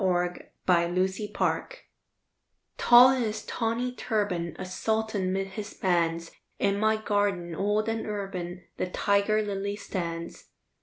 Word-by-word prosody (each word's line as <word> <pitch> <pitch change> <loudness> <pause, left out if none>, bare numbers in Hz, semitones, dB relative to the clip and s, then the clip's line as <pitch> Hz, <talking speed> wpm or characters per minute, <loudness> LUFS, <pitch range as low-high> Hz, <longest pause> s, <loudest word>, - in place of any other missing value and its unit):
THE 180 -1 +1 0.3
TIGER 170 -1 +3
LILY 190 +3 -1 1.4
Tall 245 +2 +8
in 260 -1 +1
his 215 -2 -3
tawny 235 +2 -1
turban, 205 -9 -1
A 190 - -5
sultan 220 0 -1
'mid 195 +1 -1
his 205 +2 -7
bands, 170 -3 0 0.3
In 200 0 +1
my 220 +1 +3
garden, 205 -5 0
old 205 +4 0
and 225 0 -2
urban, 185 -4 -4
The - - -1
tiger 200 +3 +2
lily 200 0 -3
stands. 170 -5 -5
200 Hz, 125 wpm, -28 LUFS, 180-215 Hz, 1.4 s, Tall